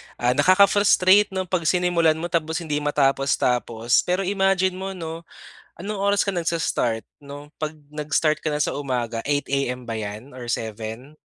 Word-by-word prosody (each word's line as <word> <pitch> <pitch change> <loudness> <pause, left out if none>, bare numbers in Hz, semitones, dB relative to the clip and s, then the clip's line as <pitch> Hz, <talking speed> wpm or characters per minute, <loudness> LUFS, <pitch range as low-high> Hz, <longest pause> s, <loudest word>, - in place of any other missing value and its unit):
ah, 120 +1 +1
nakaka-frustrate 200 +5 +5
'no, 190 - 0
'pag 175 -3 -2
sinimulan 175 -3 +2
mo 170 +2 -5
tapos 160 0 -1
hindi 150 -2 -1
matapos-tapos. 135 -5 +1
Pero 180 +2 +1
imagine 195 -1 +2
mo 190 0 -5
'no, 165 -1 -7 0.5
anong 210 +2 -4
oras 200 +1 +1
ka - - 0
nag-s-start 165 -9 -1 0.2
'no, 145 +1 -10
'pag 155 0 -3 0.2
nag-start 150 +1 -1
ka 155 - 0
na 150 - -2
sa - - 0
umaga 125 -5 -3
8 145 0 -1
AM 125 -3 -2
ba 115 - -3
'yan 110 +5 -7
or 120 -2 -4
7? 110 +6 -6
150 Hz, 160 wpm, -23 LUFS, 125-180 Hz, 0.5 s, nakaka-frustrate